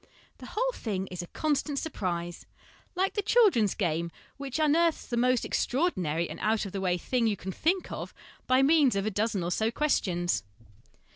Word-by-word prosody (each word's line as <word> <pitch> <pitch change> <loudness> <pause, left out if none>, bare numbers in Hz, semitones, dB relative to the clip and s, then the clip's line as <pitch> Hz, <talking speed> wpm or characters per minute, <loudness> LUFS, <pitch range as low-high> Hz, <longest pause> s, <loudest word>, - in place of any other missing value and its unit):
The - - -9
whole - - 0
thing 195 - -3
is 180 -1 -4
a 175 - -8
constant 295 - -1
surprise, 175 - -3 0.5
like 380 +2 +1
the 415 - 0
children's 375 - +4
game 170 -3 -1 0.3
which 275 -1 -4
unearths 320 +2 +2
t 240 - -2
1 - - +1
ie - - +3
most 250 -1 +2
extraordinary 180 - 0
and 155 - -8
out 215 +1 +1
of 195 - -6
the 195 - -4
way 180 -2 +1
thing 235 +6 0
you 210 -2 0
can 190 +2 -5
think 350 - 0
of - - -5 0.4
by 255 +1 +4
means 285 -5 +4
of 195 0 0
a 215 - 0
dozen 210 -1 0
or 175 - -2
so 220 +4 +1
questions. 185 -11 0
225 Hz, 195 wpm, -28 LUFS, 185-300 Hz, 0.5 s, children's